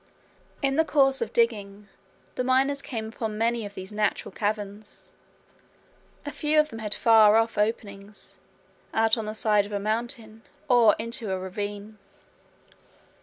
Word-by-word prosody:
In 270 Hz, 0 st, +1 dB
the 320 Hz, -, +5 dB
course 275 Hz, -3 st, +2 dB
of -, -, -2 dB
digging, 210 Hz, -3 st, 0 dB, 0.5 s
the 250 Hz, -, -2 dB
miners 270 Hz, +2 st, +2 dB
came 225 Hz, -5 st, -5 dB
upon 220 Hz, -1 st, -5 dB
many 230 Hz, -1 st, 0 dB
of 200 Hz, -, -15 dB
these 190 Hz, +1 st, -8 dB
natural 210 Hz, 0 st, -1 dB
caverns. 205 Hz, -1 st, -4 dB, 1.2 s
A 290 Hz, -, -4 dB
few 300 Hz, +2 st, +1 dB
of 305 Hz, 0 st, +2 dB
them 225 Hz, -, -7 dB
had 210 Hz, -1 st, -1 dB
far 220 Hz, -2 st, +6 dB
off 225 Hz, 0 st, +1 dB
openings 210 Hz, -1 st, -4 dB, 0.6 s
out 220 Hz, 0 st, +4 dB
on 225 Hz, -2 st, -4 dB
the 215 Hz, 0 st, -5 dB
side 210 Hz, -2 st, +2 dB
of -, -, -13 dB
a 205 Hz, -, -2 dB
mountain, 220 Hz, +1 st, -3 dB, 0.3 s
or 240 Hz, -5 st, +5 dB
into 230 Hz, -1 st, -4 dB
a 190 Hz, -, -1 dB
ravine. 205 Hz, +3 st, -6 dB
220 Hz, 150 wpm, -26 LUFS, 205-235 Hz, 1.2 s, far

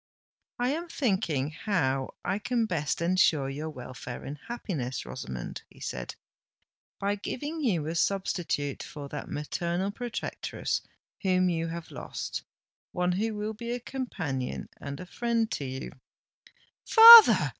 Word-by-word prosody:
"I 245 Hz, 0 st, 0 dB
am 335 Hz, +5 st, -3 dB
thinking 175 Hz, -, 0 dB
how 150 Hz, -8 st, -1 dB
I 195 Hz, -, 0 dB
can 235 Hz, +1 st, 0 dB
best 165 Hz, -5 st, -1 dB
ensure 170 Hz, -5 st, +3 dB
your 150 Hz, +3 st, -5 dB
welfare 125 Hz, -3 st, -8 dB
and 145 Hz, +1 st, -7 dB
happiness, 160 Hz, -, -4 dB
Rosamond," 60 Hz, 0 st, -6 dB
he -, -, -19 dB
said, 60 Hz, -, -5 dB, 0.8 s
"by 200 Hz, +1 st, 0 dB
giving 290 Hz, +10 st, -5 dB
you 175 Hz, -, +1 dB
a 160 Hz, -, -3 dB
substitute 170 Hz, -6 st, -1 dB
for 145 Hz, -2 st, -8 dB
that -, -, -6 dB
maternal 170 Hz, +6 st, -2 dB
protectress 240 Hz, +2 st, -3 dB, 0.4 s
whom 185 Hz, -2 st, +2 dB
you 165 Hz, -1 st, -1 dB
have 165 Hz, 0 st, -7 dB
lost—one 180 Hz, 0 st, -5 dB
who 215 Hz, +4 st, -1 dB
will 210 Hz, +1 st, -3 dB
be 235 Hz, +2 st, -7 dB
a 245 Hz, -, -3 dB
companion 180 Hz, -, -4 dB
and 140 Hz, 0 st, -7 dB
a 180 Hz, -, -7 dB
friend 230 Hz, +3 st, -1 dB
to 140 Hz, -, -3 dB
you——" 130 Hz, 0 st, -5 dB, 0.9 s
"Father!" 455 Hz, 0 st, +10 dB
180 Hz, 135 wpm, -28 LUFS, 145-225 Hz, 0.9 s, Father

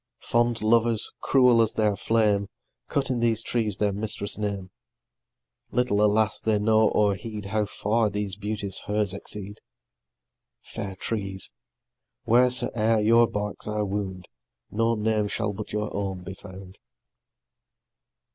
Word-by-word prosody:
Fond 120 Hz, -1 st, +1 dB
lovers, 115 Hz, 0 st, +3 dB
cruel 125 Hz, -3 st, +4 dB
as 110 Hz, -, +2 dB
their 105 Hz, -2 st, +2 dB
flame, 105 Hz, -2 st, +1 dB, 0.4 s
Cut 135 Hz, -1 st, -1 dB
in 125 Hz, -, -1 dB
these 115 Hz, -1 st, +1 dB
trees 110 Hz, -4 st, -1 dB
their 105 Hz, -2 st, +1 dB
mistress' 100 Hz, 0 st, -2 dB
name; 100 Hz, -3 st, -4 dB, 1.0 s
Little, 120 Hz, -4 st, +1 dB
alas, 105 Hz, +1 st, +2 dB
they 110 Hz, -1 st, +1 dB
know 110 Hz, +1 st, +3 dB
or 105 Hz, -1 st, +2 dB
heed 105 Hz, +1 st, -7 dB
How 105 Hz, +1 st, -1 dB
far 110 Hz, +2 st, 0 dB
these 100 Hz, -1 st, -3 dB
beauties 105 Hz, -2 st, -3 dB
hers 105 Hz, -2 st, +1 dB
exceed! 105 Hz, +1 st, -6 dB, 1.0 s
Fair 95 Hz, -2 st, -6 dB
trees! 95 Hz, -1 st, -2 dB, 0.7 s
wheres'e'er 120 Hz, -2 st, +3 dB
your 115 Hz, +1 st, +5 dB
barks 105 Hz, 0 st, -4 dB
I 105 Hz, 0 st, -1 dB
wound, 95 Hz, -2 st, -4 dB, 0.4 s
No 115 Hz, +2 st, +1 dB
name 105 Hz, -1 st, 0 dB
shall 105 Hz, 0 st, -2 dB
but 105 Hz, +1 st, -7 dB
your 105 Hz, 0 st, -3 dB
own 95 Hz, -2 st, -3 dB
be 95 Hz, -, -7 dB
found. 95 Hz, -1 st, -12 dB
105 Hz, 130 wpm, -25 LUFS, 100-115 Hz, 1.0 s, your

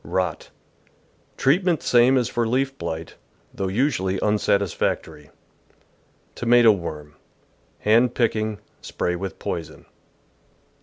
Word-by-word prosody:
Rot. -, -, -2 dB, 0.4 s
— -, -, -38 dB
Treatment 170 Hz, +2 st, +2 dB
same 125 Hz, +2 st, +4 dB
as 125 Hz, -3 st, +1 dB
for 120 Hz, -1 st, -1 dB
leaf 135 Hz, +3 st, 0 dB
blight, 80 Hz, -1 st, -6 dB, 0.4 s
though 95 Hz, -, -3 dB
usually 95 Hz, -4 st, 0 dB
unsatisfactory. 100 Hz, -7 st, -1 dB, 1.0 s
Tomato 120 Hz, -1 st, +5 dB
Worm. 75 Hz, -6 st, -5 dB, 0.4 s
— -, -, -39 dB
Hand 115 Hz, +3 st, +3 dB
picking; 110 Hz, -2 st, 0 dB, 0.2 s
spray 90 Hz, -, -2 dB
with 95 Hz, 0 st, -6 dB
poison. 80 Hz, -2 st, -6 dB
110 Hz, 105 wpm, -23 LUFS, 90-120 Hz, 1.0 s, Tomato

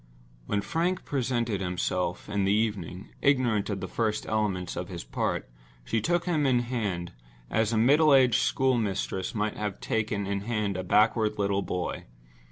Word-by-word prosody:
When 100 Hz, -, 0 dB
Frank 175 Hz, -, -1 dB
presented 120 Hz, -6 st, -1 dB
himself 90 Hz, -1 st, -2 dB
in 100 Hz, -1 st, 0 dB
the 95 Hz, -, +2 dB
evening, 100 Hz, -4 st, -1 dB
ignorant 125 Hz, -7 st, +2 dB
of 100 Hz, -2 st, -3 dB
the 95 Hz, -, -3 dB
first 110 Hz, +1 st, -1 dB
elements 100 Hz, -5 st, -1 dB
of -, -, -4 dB
his -, -, -6 dB
part, -, -, -2 dB, 0.4 s
she 110 Hz, -, 0 dB
took 175 Hz, +7 st, +1 dB
him 155 Hz, -5 st, +1 dB
in 125 Hz, -2 st, +3 dB
hand, 105 Hz, -8 st, -3 dB, 0.4 s
as 110 Hz, 0 st, +2 dB
a 115 Hz, -, +1 dB
middle 145 Hz, +7 st, +5 dB
aged 130 Hz, -4 st, +5 dB
schoolmistress 115 Hz, -5 st, 0 dB
might 105 Hz, 0 st, -1 dB
have 105 Hz, -2 st, -3 dB
taken 110 Hz, -2 st, -1 dB
in 100 Hz, 0 st, -2 dB
hand 105 Hz, -2 st, -1 dB
a 95 Hz, -, -3 dB
backward 105 Hz, +3 st, +3 dB
little 100 Hz, -1 st, +1 dB
boy. 90 Hz, -2 st, -3 dB
110 Hz, 165 wpm, -28 LUFS, 100-120 Hz, 0.4 s, middle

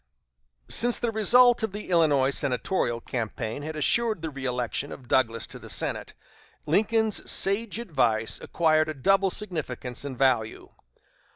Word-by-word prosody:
Since 240 Hz, +1 st, +3 dB
the 235 Hz, -2 st, -1 dB
result 240 Hz, +3 st, +5 dB
of 220 Hz, -3 st, -2 dB
the 210 Hz, -2 st, -7 dB
Illinois 145 Hz, -6 st, +3 dB
senatorial 125 Hz, -, -1 dB
campaign 115 Hz, +1 st, -4 dB
had 155 Hz, +2 st, -6 dB
assured 215 Hz, +5 st, +1 dB
the 160 Hz, -, -2 dB
reëlection 130 Hz, 0 st, -3 dB
of 130 Hz, -, -10 dB
Douglas 115 Hz, -3 st, +1 dB
to -, -, -10 dB
the -, -, -12 dB
Senate, -, -, -2 dB, 0.5 s
Lincoln's 220 Hz, +5 st, +1 dB
sage 205 Hz, +3 st, 0 dB
advice 130 Hz, -, -1 dB
acquired 155 Hz, -2 st, +1 dB
a 155 Hz, -, -4 dB
double 195 Hz, +7 st, +2 dB
significance 150 Hz, -, -4 dB
and 135 Hz, -3 st, -6 dB
value. 120 Hz, -5 st, 0 dB
155 Hz, 135 wpm, -26 LUFS, 125-205 Hz, 0.5 s, result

